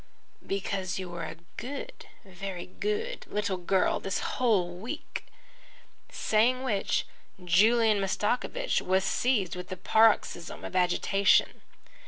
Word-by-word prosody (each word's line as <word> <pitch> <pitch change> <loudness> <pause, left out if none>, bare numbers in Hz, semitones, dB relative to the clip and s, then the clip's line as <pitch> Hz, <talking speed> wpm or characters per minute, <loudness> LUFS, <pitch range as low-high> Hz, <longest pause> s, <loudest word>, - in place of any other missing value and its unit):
"Because 195 -1 -2
you 185 -2 -5
were 170 -1 -5
a - - -6 0.2
good, 285 - -7 0.2
very 190 -1 -6
good 425 - -3
little 205 -2 -1
girl 180 +1 +1
the - - -6
whole 195 -8 +1
week." 205 +7 -6 0.8
Saying 245 +4 +2
which, 215 -7 0 0.4
Julian 215 +3 +4
Mastakovich 245 - 0
was 190 +1 +1
seized 200 -5 +1
with 180 0 -8
a 185 - -4
paroxysm 210 -3 +2
of - - -7
agitation. 185 +2 +3
195 Hz, 115 wpm, -29 LUFS, 185-235 Hz, 0.8 s, Julian